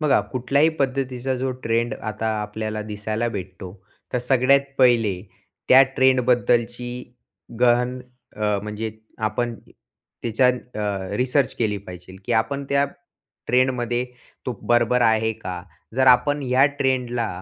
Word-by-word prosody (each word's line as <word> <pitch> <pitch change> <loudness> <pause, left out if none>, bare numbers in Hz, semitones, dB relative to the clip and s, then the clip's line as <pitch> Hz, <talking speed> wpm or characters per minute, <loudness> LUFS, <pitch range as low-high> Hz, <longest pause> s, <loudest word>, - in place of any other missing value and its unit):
बघा, 150 -3 +3
कुठल्याही 140 +5 +2
पद्धतीचा 130 -1 -1
जो 130 +1 -2
ट्रेंड 115 +1 0
आता 110 +1 -5
आपल्याला 110 +1 -4
दिसायला 110 +2 -3
भेटतो. 95 -3 -7 0.4
तर 125 - +1
सगळ्यात 130 +2 +3 0.2
पहिले 115 -7 +3 0.5
त्या 130 +1 +9
ट्रेंडबद्दलची 125 -2 +2 0.7
गहन 125 +1 +3 0.4
अ, 105 -1 0
म्हणजे 105 +1 -4 0.4
आपण 120 +2 -2 0.7
तिच्या 120 +2 +2
अ, 105 -6 -3
रिसर्च 125 +1 +1
केली 105 -3 0
पाहिजे 90 -1 -11
की 120 - -1
आपण 115 +5 0
त्या 140 0 +3 0.6
ट्रेंडमध्ये 125 -1 +1 0.4
तो 125 - -1
बरोबर 120 +1 +2
आहे 110 -1 +3
का? 90 -4 -7 0.3
जर 130 0 +3
आपण 130 +4 +4
ह्या 130 +1 +3 0.2
ट्रेंडला 125 -3 0
120 Hz, 120 wpm, -23 LUFS, 110-130 Hz, 0.7 s, त्या